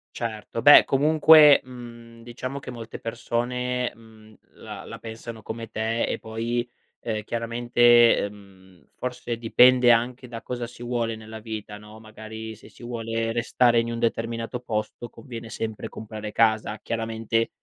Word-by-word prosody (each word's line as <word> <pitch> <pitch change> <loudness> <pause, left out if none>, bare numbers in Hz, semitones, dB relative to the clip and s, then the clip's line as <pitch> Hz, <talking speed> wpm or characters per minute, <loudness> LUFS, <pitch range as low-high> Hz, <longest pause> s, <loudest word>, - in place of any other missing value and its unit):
Certo. 115 -1 -5
Beh 145 +3 +9
comunque, 150 +1 +6
mhmm, 120 -2 -12
diciamo 130 +3 -6
che 135 - -10
molte 115 -2 -8
persone, 125 +2 -2
mhmm, 110 -1 -18 0.2
la - - -9
la - - -9
pensano 115 0 -9
come 115 +1 -7
te, 110 +1 -1
e - - -3
poi, 115 +2 -3 0.3
ehm, 110 -2 -4
chiaramente, 120 +1 +4
ehm, 95 -3 -10
forse 125 -2 -5
dipende 125 +2 +5
anche 120 +2 0
da 115 -1 -8
cosa 120 -1 -5
si 120 0 -12
vuole 120 -2 -2
nella 110 0 -10
vita, 105 -2 -7
no, 105 +1 -14
magari 110 0 -9
se 110 - -16
si - - -17
vuole 115 -1 -3
restare 120 +1 +2
in 115 0 -2
un 115 - -4
determinato 115 +1 -2
posto 115 0 -4
conviene 115 -4 -10
sempre 110 -1 -5
comprare 110 -1 -8
casa 110 -1 +1
chiaramente, 115 +1 -2
115 Hz, 145 wpm, -25 LUFS, 110-120 Hz, 0.3 s, Beh